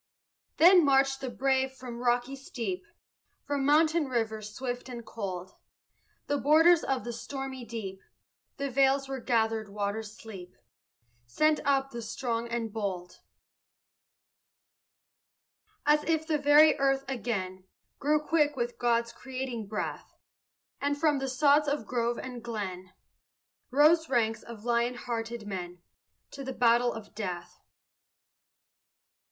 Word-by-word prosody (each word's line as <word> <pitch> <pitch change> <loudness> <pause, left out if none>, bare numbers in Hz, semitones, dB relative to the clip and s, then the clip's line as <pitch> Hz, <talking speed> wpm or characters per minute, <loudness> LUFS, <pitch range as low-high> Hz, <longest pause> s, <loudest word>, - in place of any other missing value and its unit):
Then 355 +1 +8
marched 270 -1 +3
the 265 - -3
brave 265 +1 +1
from 250 -2 -8
rocky 245 +2 +1
steep, 220 -9 -5 0.6
From 285 -1 -2
mountain 310 +3 +4
river 225 -4 -1
swift 245 +4 -5
and 240 -2 -7
cold; 185 -4 -5 0.7
The 290 0 0
borders 325 +4 +5
of 265 -2 -1
the 240 - -5
stormy 265 +1 -6
deep, 195 -5 -6 0.6
The 280 -1 -3
vales 275 +1 +3
where 270 -1 -4
gathered 225 -3 0
waters 210 +1 -4
sleep, 190 -5 -11 0.7
Sent 305 - +2
up 275 -1 +2
the 235 - -6
strong 230 +1 -3
and 230 -2 -3
bold, 185 -5 -4 2.7
As 300 +1 +4
if 320 -1 +1
the 310 -2 0
very 295 +1 +6
earth 270 0 +2
again 190 -8 -3 0.3
Grew 300 +2 +2
quick 300 -1 +2
with 240 -1 -3
God's 235 -1 +1
creating 255 -4 -5
breath, 210 +1 -5 0.7
And, 285 0 0
from 295 -2 +2
the 270 0 -2
sods 290 +3 +4
of 285 -5 -1
grove 235 0 -1
and 250 -2 -7
glen, 190 -5 -5 0.8
Rose 310 +3 +4
ranks 225 -3 +1
of 230 -2 -11
lion 240 +1 +1
hearted 235 -2 -4
men 180 -3 -6 0.5
To 275 - -7
battle 240 0 +3
to 225 - -5
the 205 - -19
death. 180 -4 -6
245 Hz, 125 wpm, -29 LUFS, 220-275 Hz, 2.7 s, Then